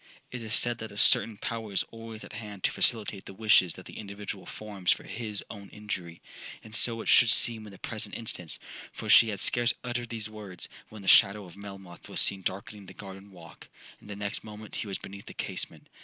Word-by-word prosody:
'It 125 - -5
is 110 0 +2
said 120 0 +2
that 110 -1 -6
a 100 - -11
certain 115 -2 +5
power 115 0 -4
is 95 - +2
always 115 -1 -9
at - - -11
hand 105 -3 -8
to - - +3
facilitate 105 -4 +2
the 95 - -9
wishes 100 -5 +4
that - - -11
the - - -9
individual 100 -1 -7
forms 100 -4 -1
for - - 0
his 110 -3 -4
own 100 -2 -10
injury; 95 -5 -6 0.4
and 110 0 -9
so 115 0 +1
it - - -8
should 120 -3 +7
seem 110 -1 +5
in - - -10
the 95 - -12
present 110 0 -3
instance,—for 90 -7 -4
she 115 - +8
had 100 -3 -3
scarce 120 +3 +4
uttered 120 -1 -3
these 110 -2 -1
words, 105 -4 -7 0.2
when 110 -2 -10
the - - -9
shadow 100 +2 +6
of 85 - -13
Melmoth 95 -3 -10
was - - +1
seen 100 -1 +4
darkening 100 +1 -5
the - - -11
garden 95 -1 -10
walk,—and 90 +3 -15
the 105 - -5
next 100 0 -3
moment 105 0 -10
he - - -3
was 100 - -2
beneath 100 0 -10
the - - -9
casement. - - -4
105 Hz, 215 wpm, -29 LUFS, 100-110 Hz, 0.4 s, she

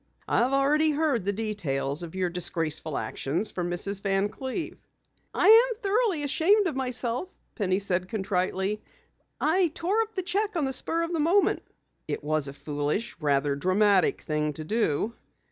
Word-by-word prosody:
"I've 245 +3 +2
already 290 +3 +3
heard 290 - 0
the 200 - +1
details 180 -9 -2
of 170 0 -7
your 185 -2 -1
disgraceful 165 -3 0
actions 170 +10 -2
from 175 -1 -3
Mrs. 195 +3 -3
Van 195 0 +1
Cleve." 265 - -5 0.5
"I'm 465 +3 +6
thoroughly 415 -6 0
ashamed 380 +9 +3
of 325 -7 -1
myself," 255 +4 -1 0.2
Penny 185 -3 0
said 185 -2 -1
contritely. 190 0 -1 0.6
"I 355 +3 +3
tore 390 +7 +1
up 445 0 -5
the 375 - -1
cheque 400 +3 -1
on 315 -4 +1
the 265 - -2
spur 330 +5 -1
of 335 +1 -3
the 330 - 0
moment." 345 +7 +3 0.5
"It - - -4
was 155 -1 0
a 140 - -7
foolish, 150 +9 -3
rather 140 -2 +1
dramatic 190 +5 +2
thing 150 -1 -1
to 155 - -7
do. 215 +2 0
210 Hz, 160 wpm, -27 LUFS, -, 0.6 s, I'm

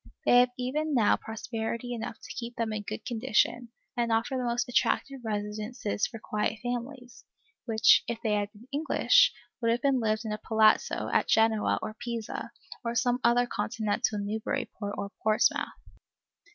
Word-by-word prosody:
They 245 - +7
have 250 0 +5
even 290 +4 -1
now 225 -4 +4
prosperity 225 +2 -4
enough 225 -2 -5
to - - -8
keep 235 -1 -6
them 225 -1 -2
in 215 - -2
good 215 +1 -6
condition, 240 0 +1 0.3
and 235 -1 0
offer 225 +4 +1
the 255 - -1
most 240 0 0
attractive 270 +2 +1
residences 210 0 -2
for 230 - -9
quiet 215 +1 -2
families, 245 +1 -5 0.4
which, 220 -3 +5
if 235 - -2
they 220 -2 +1
had 205 0 0
been 220 +4 -17
English, 325 - +4 0.3
would 230 - +2
have 235 +1 +1
lived 220 -3 0
in 220 - -3
a 210 - -3
palazzo 220 0 +3
at - - +3
Genoa 220 -1 +3
or 215 0 -5
Pisa, 235 -2 -4 0.3
or 235 0 -2
some 245 +1 +2
other 240 +1 +4
Continental 220 -2 -1
Newburyport 205 0 -3
or 200 0 -4
Portsmouth. 215 0 +2
230 Hz, 160 wpm, -29 LUFS, 215-245 Hz, 0.4 s, They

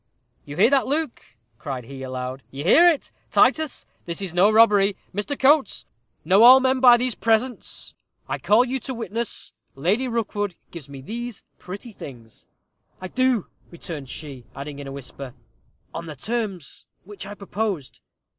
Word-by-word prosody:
"You 145 +1 -8
hear 210 +7 +5
that, 275 -2 +3
Luke," 300 -1 -1 0.4
cried 130 -4 -5
he, 135 +3 -10
aloud; 130 0 -5
"you 140 +1 -7
hear 335 - +7
it, 320 -5 -2 0.2
Titus; 315 -3 +2 0.2
this 170 -1 -4
is 190 -4 -4
no 180 +4 +5
robbery. 210 -3 +5 0.2
Mr. 205 +9 -3
Coates 275 -4 +3 0.4
'Know 190 +5 +5
all 255 +3 +10
men 260 0 +1
by 245 -2 +8
these 250 0 +2
presents' 230 +3 -1 0.3
I - - -3
call 225 +4 +4
you 260 +1 -2
to 260 +2 -5
witness, 230 0 -3 0.2
Lady 195 - +1
Rookwood 205 -5 -2 0.2
gives 155 -5 -10
me 140 -1 -9
these 235 - -6 0.2
pretty 200 +6 -8
things." 120 - -12 0.5
"I 185 - -7
do," 255 -4 +1 0.2
returned 160 -5 -8
she; 135 -5 -8
adding, 140 +1 -7
in 140 - -7
a - - -6
whisper, 135 -1 -9 0.6
"on 170 0 -6
the 155 - -7
terms 200 - -4 0.2
which 195 0 -9
I 205 - -8
proposed." 200 -7 -4
200 Hz, 160 wpm, -23 LUFS, 145-240 Hz, 0.6 s, all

